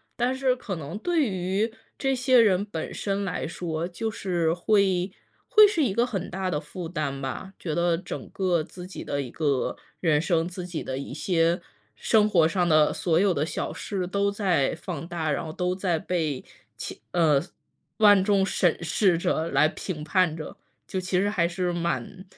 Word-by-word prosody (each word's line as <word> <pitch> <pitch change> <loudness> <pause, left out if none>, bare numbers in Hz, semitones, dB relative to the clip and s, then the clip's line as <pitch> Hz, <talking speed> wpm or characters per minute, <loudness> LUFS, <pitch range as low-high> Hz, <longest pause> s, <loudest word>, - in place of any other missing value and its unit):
但 245 +2 +1
是 260 -1 +2
可 215 -6 -5
能 160 +1 -6
对 340 +6 +1
于 195 +3 -1 0.2
这 270 -1 +1
些 255 0 +4
人 200 -4 +4
本 165 -6 -5
身 200 0 -2
来 180 - -3
说， 165 -1 -3
就 220 +5 -3
是 175 -6 0
会 190 0 +2 0.4
会 425 -1 +8
是 345 -7 +1
一 240 - +1
个 235 +5 +2
很 195 -7 -4
大 185 0 -2
的 150 -3 -1
负 165 +3 -7
担 150 -5 -3
吧。 135 +8 -5
觉 160 - -4
得 170 +1 +2
整 180 +2 -7
个 180 -4 0
自 180 +2 -10
己 185 - -8
的 140 - -2
一 125 - -8
个 145 -5 0 0.2
人 155 -4 +3
生， 165 -1 +1
自 180 0 -6
己 170 -3 -4
的 130 0 -4
一 140 - -7
些 170 0 +1 0.4
生 210 - +3
活 170 -6 +5
上 175 +1 +1
的 155 -1 +5
所 165 -2 +1
有 195 -1 +3
的 145 - 0
小 160 - -3
事， 190 -3 -3
都 200 +2 +1
在 185 -9 +1
放 165 -4 -6
大， 165 -3 -2
然 140 - -1
后 160 - -6
都 180 +3 -1
在 185 -3 0
被 160 -5 -2 0.3
其 - - -7
呃， 155 -5 +4 0.6
万 205 -3 +6
众 195 -1 +3
审 180 -3 +1
视 175 +2 +2
着、 165 -1 0
来 155 - +4
评 155 0 -5
判 165 0 +2
着。 155 - -7 0.3
就 190 - -2
其 185 0 0
实 200 - +2
还 180 -5 +1
是 175 +1 -2
蛮 175 +2 -3
180 Hz, 205 characters per minute, -26 LUFS, 160-200 Hz, 0.6 s, 会